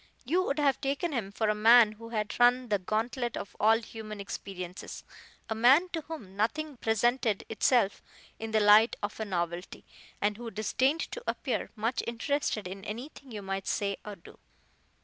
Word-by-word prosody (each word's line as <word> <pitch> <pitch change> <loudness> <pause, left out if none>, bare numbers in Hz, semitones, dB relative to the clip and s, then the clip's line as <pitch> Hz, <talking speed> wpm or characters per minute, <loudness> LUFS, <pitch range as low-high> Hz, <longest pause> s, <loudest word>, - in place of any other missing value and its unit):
You 340 +9 +2
would 280 - -1
have 280 -3 +2
taken 285 +4 -1
him 215 -7 -2
for 220 +2 -1
a 210 - +3
man 225 +1 +7
who 230 +2 -11
had 215 -1 -3
run 245 0 +4
the 205 -2 +2
gauntlet 235 +5 -2
of - - -7
all 220 +2 +5
human 220 -2 -8
experiences 185 -2 -7 0.4
a - - -1
man 265 +11 +5
to 330 -2 -3
whom 290 -12 -9
nothing 280 +7 -1
presented 225 -1 +1
itself 225 -2 +2 0.4
in 225 - -4
the 220 0 +2
light 210 +3 +6
of 205 +1 -4
a 220 - -2
novelty, 175 -2 -4 0.3
and 205 0 0
who 235 0 -6
disdained 260 +8 0
to 485 - -6
appear - - -2
much 225 +2 -1
interested 235 -3 -1
in 195 +1 -8
anything 255 +5 -8
you 210 -2 -6
might 195 0 -4
say 200 -1 -1
or 210 -1 -7
do. - - -16
225 Hz, 175 wpm, -29 LUFS, 205-250 Hz, 0.4 s, man